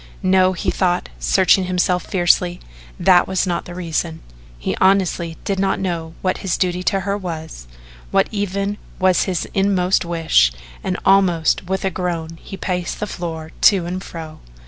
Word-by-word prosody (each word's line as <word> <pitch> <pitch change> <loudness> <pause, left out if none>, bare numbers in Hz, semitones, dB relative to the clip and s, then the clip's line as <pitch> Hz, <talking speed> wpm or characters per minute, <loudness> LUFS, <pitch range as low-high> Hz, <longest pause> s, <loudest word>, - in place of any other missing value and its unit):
No, 185 0 +4
he 180 - -1
thought, 180 -1 0
searching 190 0 +3
himself 180 0 0
fiercely, 175 -1 +2 0.4
that 180 -2 +5
was 190 0 0
not 175 -2 -2
the 175 - -9
reason. 165 -2 -3 0.4
He - - -2
honestly 185 -3 +2
did 195 -1 -1
not 195 0 +1
know 170 -3 -3
what 185 -1 0
his 190 -3 -1
duty 180 0 0
to 195 +1 +1
her 200 +1 -1
was 160 - -6 0.4
what - - +3
even 200 0 -2 0.2
was 185 -1 +3
his 185 -3 -1
inmost 195 -2 +2
wish, 165 - +3 0.3
and 185 -1 -1
almost 185 -4 +3
with 190 +1 -2
a 190 - +1
groan 165 -2 -4
he 195 - -8
paced 180 -2 -3
the - - -1
floor 165 -4 -6 0.2
to 190 -4 -1
and 185 +2 -4
fro. 160 -2 -8
180 Hz, 165 wpm, -20 LUFS, 170-190 Hz, 0.4 s, that